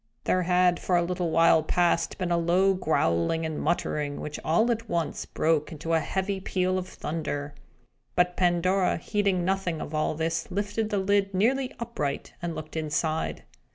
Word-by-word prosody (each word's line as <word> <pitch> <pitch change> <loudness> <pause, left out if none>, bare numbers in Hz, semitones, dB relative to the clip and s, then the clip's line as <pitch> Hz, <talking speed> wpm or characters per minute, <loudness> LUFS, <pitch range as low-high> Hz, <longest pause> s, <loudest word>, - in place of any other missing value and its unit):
There 185 - +2
had 180 0 +3
for 180 - +1
a 175 - +2
little 175 0 -1
while 165 0 +5
past 170 +2 +1
been 180 -2 -2
a - - +4
low 180 +3 +3
growling 155 - +1
and 160 -1 -3
muttering, 150 -3 -1
which 150 - -5
all 220 +10 +3
at 230 0 -3
once 170 -2 -2
broke 155 -2 0
into 165 +1 -3
a 165 - +4
heavy 190 +3 -2
peal 185 -1 0
of 185 - -6
thunder. 145 -4 -4 0.6
But 180 0 +2
Pandora, 180 +1 +2
heeding 195 -1 0
nothing 190 -4 -1
of 150 - -6
all 155 0 0
this, 165 +1 -2
lifted 205 +3 -2
the 205 - 0
lid 195 0 +1
nearly 255 +7 +2
upright, 185 -12 -3
and 170 -1 -3
looked 155 0 -8
inside. 155 0 -1
175 Hz, 170 wpm, -27 LUFS, 160-190 Hz, 0.6 s, while